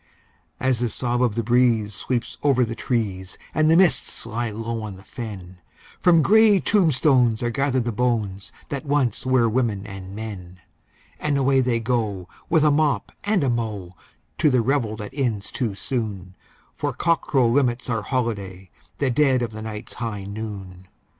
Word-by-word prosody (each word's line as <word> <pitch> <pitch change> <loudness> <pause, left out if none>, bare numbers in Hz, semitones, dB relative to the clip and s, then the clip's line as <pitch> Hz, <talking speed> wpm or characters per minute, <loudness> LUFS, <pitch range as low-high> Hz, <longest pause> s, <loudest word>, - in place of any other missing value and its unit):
As 130 -2 +1
the 120 -1 0
sob 120 +1 -1
of 120 -4 +2
the 115 - 0
breeze 115 -3 +2
sweeps 120 +4 -3
over 135 -4 +3
the 115 - -5
trees, 105 -6 -3 0.2
and 155 0 +3
the 165 - +6
mists 185 -9 +2
lie 115 +1 -2
low 115 +1 -4
on 105 -3 -6
the 95 - -14
fen, 100 -6 -8 0.4
From 170 -3 +5
grey 215 0 +6
tombstones 135 - +3
are 120 - 0
gathered 135 0 0
the 120 - -2
bones 105 -4 -1 0.2
that 140 -1 -4
once 140 -5 0
were 130 -2 +4
women 110 -4 0
and 95 -1 -8
men, 95 -5 -7 0.6
And 150 -2 0
away 135 0 +3
they 120 -2 +1
go, 110 -6 -1 0.2
with 160 -3 +4
a 150 - +5
mop 150 -1 +1
and 205 -5 +2
a 135 - +2
mow, 105 -6 -3 0.5
to 150 - +4
the 130 -3 +3
revel 120 -4 0
that 105 -1 -8
ends 120 -8 -2
too 115 -7 -2
soon, 100 -6 -4 0.4
For - - -2
cockcrow 150 -6 +2
limits 125 -3 +1
our 115 -3 -1
holiday—the 100 - -4
dead 130 -1 +3
of 115 - -3
the 110 0 -8
night's 110 0 -7
high 110 -5 -4
noon! 100 -3 -7
120 Hz, 165 wpm, -23 LUFS, 105-130 Hz, 0.6 s, the